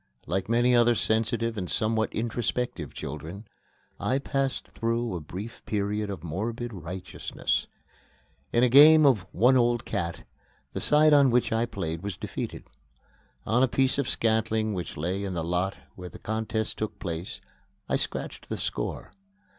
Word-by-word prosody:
Like 95 Hz, +5 st, -2 dB
many 120 Hz, +2 st, +4 dB
other 120 Hz, 0 st, +5 dB
sensitive 115 Hz, +1 st, 0 dB
and 90 Hz, -, -4 dB
somewhat 110 Hz, 0 st, +1 dB
introspective 115 Hz, -, -2 dB
children, 80 Hz, +9 st, -7 dB, 0.5 s
I 130 Hz, -, +1 dB
passed 135 Hz, -1 st, -2 dB
through 115 Hz, -1 st, -1 dB
a 90 Hz, -, -2 dB
brief 95 Hz, +9 st, -8 dB
period 105 Hz, 0 st, -1 dB
of 95 Hz, -5 st, -6 dB
morbid 115 Hz, +8 st, -3 dB
righteousness. 90 Hz, 0 st, -3 dB, 0.8 s
In 120 Hz, -, +3 dB
a -, -, +6 dB
game 150 Hz, +4 st, +8 dB
of 110 Hz, -10 st, +3 dB
"one 125 Hz, +7 st, +4 dB
old 120 Hz, -2 st, +2 dB
cat," 85 Hz, -5 st, -3 dB, 0.5 s
the -, -, -2 dB
side 150 Hz, +1 st, +5 dB
on 140 Hz, -2 st, +6 dB
which 120 Hz, 0 st, +2 dB
I 115 Hz, +1 st, +1 dB
played 85 Hz, -7 st, -4 dB
was 100 Hz, -3 st, -5 dB
defeated. -, -, -5 dB, 0.8 s
On 115 Hz, +3 st, +2 dB
a 130 Hz, -, +5 dB
piece 130 Hz, +2 st, +1 dB
of 140 Hz, -, 0 dB
scantling 110 Hz, -1 st, +1 dB
which 90 Hz, -4 st, -5 dB
lay 90 Hz, +6 st, -2 dB
in 95 Hz, -2 st, -3 dB
the 85 Hz, -, -1 dB
lot 90 Hz, +3 st, -1 dB, 0.2 s
where 90 Hz, -1 st, -8 dB
the -, -, -11 dB
contest 110 Hz, 0 st, -3 dB
took 110 Hz, -, -3 dB
place, 85 Hz, 0 st, -5 dB, 0.5 s
I -, -, +1 dB
scratched -, -, -3 dB
the -, -, -2 dB
score. -, -, -3 dB
110 Hz, 155 wpm, -27 LUFS, 95-120 Hz, 0.8 s, game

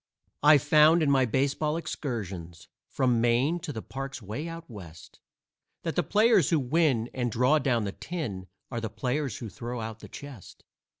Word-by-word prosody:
I've 145 Hz, -2 st, +6 dB
found, 155 Hz, +3 st, +5 dB
in 140 Hz, -, +3 dB
my 135 Hz, -2 st, +4 dB
baseball 140 Hz, +5 st, 0 dB
excursions, 100 Hz, -, -5 dB, 0.2 s
From 125 Hz, -3 st, +1 dB
Maine 125 Hz, +8 st, +2 dB
to 170 Hz, -2 st, -6 dB
the 110 Hz, -6 st, -6 dB
parks 135 Hz, 0 st, -6 dB
way 110 Hz, -, -5 dB
out 165 Hz, 0 st, -8 dB
West, 85 Hz, -9 st, -12 dB, 0.6 s
That 165 Hz, -, -3 dB
the 175 Hz, -, +3 dB
players 210 Hz, -, +4 dB
who 165 Hz, -, +3 dB
win 135 Hz, -4 st, +1 dB
and 120 Hz, -2 st, -1 dB
draw 125 Hz, +6 st, +3 dB
down 125 Hz, -5 st, +1 dB
the 100 Hz, -, -2 dB
tin, 105 Hz, -, -5 dB, 0.2 s
Are 120 Hz, -2 st, -3 dB
the 110 Hz, -, -3 dB
players 125 Hz, +5 st, -2 dB
who 115 Hz, -, -6 dB
throw 120 Hz, +6 st, -6 dB
out 110 Hz, 0 st, -6 dB
the -, -, -12 dB
chest. 140 Hz, -9 st, -11 dB
130 Hz, 175 wpm, -28 LUFS, 115-155 Hz, 0.6 s, I've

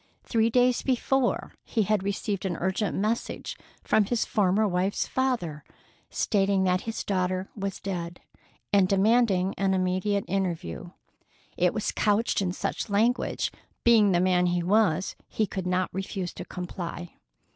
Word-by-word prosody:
Three 225 Hz, 0 st, +2 dB
days 250 Hz, +1 st, +3 dB
before 265 Hz, 0 st, 0 dB
he 225 Hz, -, 0 dB
had 210 Hz, 0 st, +1 dB
received 200 Hz, 0 st, -2 dB
an 180 Hz, -4 st, -2 dB
urgent 190 Hz, +3 st, -1 dB
message 215 Hz, +4 st, -2 dB, 0.3 s
from 215 Hz, -, +3 dB
his 235 Hz, +3 st, 0 dB
former 205 Hz, +1 st, +2 dB
wife's 185 Hz, +1 st, 0 dB
father, 230 Hz, -, -1 dB, 0.5 s
stating 195 Hz, -2 st, +1 dB
that 185 Hz, 0 st, +2 dB
his 225 Hz, -, -3 dB
daughter 185 Hz, -1 st, -1 dB
was 195 Hz, -2 st, -4 dB
dead, 175 Hz, -3 st, -5 dB, 0.5 s
and 195 Hz, -2 st, +5 dB
demanding 195 Hz, -2 st, +3 dB
an 195 Hz, -1 st, +2 dB
immediate 185 Hz, +2 st, 0 dB
interview. 175 Hz, -, -3 dB, 0.7 s
It 180 Hz, 0 st, +2 dB
was 215 Hz, -1 st, -1 dB
couched 210 Hz, +1 st, +1 dB
in 185 Hz, -2 st, 0 dB
such 185 Hz, -, -3 dB
language 225 Hz, +5 st, +1 dB
that, -, -, -24 dB, 0.2 s
being 220 Hz, -4 st, +5 dB
the 175 Hz, -, +3 dB
man 180 Hz, 0 st, +3 dB
he 175 Hz, 0 st, 0 dB
was, 190 Hz, -2 st, +2 dB
he 220 Hz, -, 0 dB
could 190 Hz, -2 st, -4 dB
not 185 Hz, 0 st, 0 dB
refuse 190 Hz, -1 st, -4 dB
to -, -, -7 dB
comply. 175 Hz, -1 st, -6 dB
195 Hz, 145 wpm, -27 LUFS, 180-215 Hz, 0.7 s, and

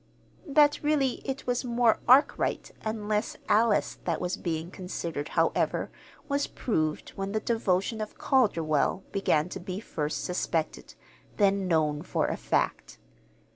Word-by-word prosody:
That 295 Hz, 0 st, +4 dB
really 290 Hz, -4 st, +1 dB
it 270 Hz, +1 st, -4 dB
was 245 Hz, +1 st, 0 dB
more 240 Hz, -2 st, +2 dB
Arkwright 260 Hz, +4 st, +3 dB
and 220 Hz, -1 st, -4 dB
less 210 Hz, +1 st, -1 dB
Alice 220 Hz, 0 st, +2 dB
that 170 Hz, -3 st, 0 dB
was 180 Hz, +1 st, -2 dB
being 165 Hz, -2 st, -3 dB
considered, 170 Hz, -5 st, -5 dB
however, -, -, +1 dB, 0.4 s
was 285 Hz, 0 st, 0 dB
proved 155 Hz, -10 st, -2 dB
when 195 Hz, +1 st, -4 dB
the 215 Hz, -, +1 dB
devotion 215 Hz, -1 st, 0 dB
of 215 Hz, -, -6 dB
Calderwell 190 Hz, -, +2 dB
began 165 Hz, -5 st, +1 dB
to 190 Hz, -, -6 dB
be 185 Hz, +1 st, -5 dB
first 155 Hz, -8 st, -3 dB
suspected, 170 Hz, -3 st, -2 dB, 0.4 s
then 200 Hz, -2 st, +3 dB
known 155 Hz, -3 st, +1 dB
for -, -, -1 dB
a -, -, -1 dB
fact. -, -, -1 dB
200 Hz, 135 wpm, -28 LUFS, 170-235 Hz, 0.4 s, That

